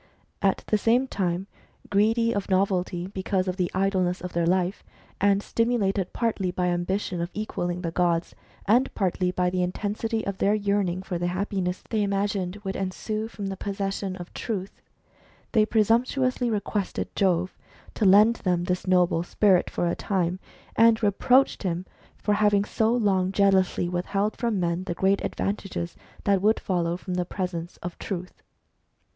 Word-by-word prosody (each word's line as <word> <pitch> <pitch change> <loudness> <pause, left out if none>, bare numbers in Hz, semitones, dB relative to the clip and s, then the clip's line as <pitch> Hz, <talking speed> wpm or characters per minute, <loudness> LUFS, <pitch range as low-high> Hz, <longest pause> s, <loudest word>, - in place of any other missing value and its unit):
At 195 -2 +1
the 215 - +1
same 240 +5 +3
time, 185 -4 -1 0.5
greedy 225 +3 +3
of 205 -1 -3
novelty 185 -2 +1
because 190 0 -2
of 185 0 -2
the 180 -2 0
idleness 185 -2 +1
of 180 -1 -7
their 170 0 +1
life, 185 +1 0 0.4
and 200 0 +3
stimulated 205 -5 0
partly 220 -6 -1
by 180 0 0
ambition 175 +1 -1
of 170 - -2
equalling 180 -4 -3
the 165 -2 -3
gods, 170 -1 +1 0.3
and 245 +6 +4
partly 185 -2 0
by 180 0 0
the 185 0 0
intensity 210 +5 -2
of 200 -1 -4
their 205 +2 +3
yearning 200 -3 0
for 180 -2 -3
the 175 - 0
happiness 185 0 -2
they 220 -2 0
imagined 200 -2 -1
would 190 0 -3
ensue 215 +3 -3
from 210 -3 -7
the 195 0 -3
possession 195 -1 -3
of 175 -2 -9
Truth, 200 -4 -5 0.7
they 215 -2 +3
presumptuously 245 +3 +2
requested 205 -2 -2
Jove 185 -2 +1 0.4
to - - -2
lend 210 +4 +6
them 180 -2 0
this 180 +1 -2
noble 180 -2 +3
spirit 185 +1 +3
for - - -1
a 170 - +1
time, 185 -2 -1 0.4
and 225 0 +5
reproached 250 +6 +3
him 180 -1 -2 0.3
for 210 - 0
having 205 -1 +3
so 220 +1 +1
long 195 -6 +2
jealously 190 -3 +2
withheld 195 +4 -1
from 230 -4 -1
men 175 +1 -1
the 175 -3 -3
great 195 +2 +2
advantages 195 -4 -3 0.3
that 200 -2 +2
would 215 +2 +3
follow 175 -2 -1
from 185 0 -6
the 180 0 0
presence 175 -2 -4
of 175 0 -6
Truth. 180 -2 -6
195 Hz, 160 wpm, -26 LUFS, 180-210 Hz, 0.7 s, lend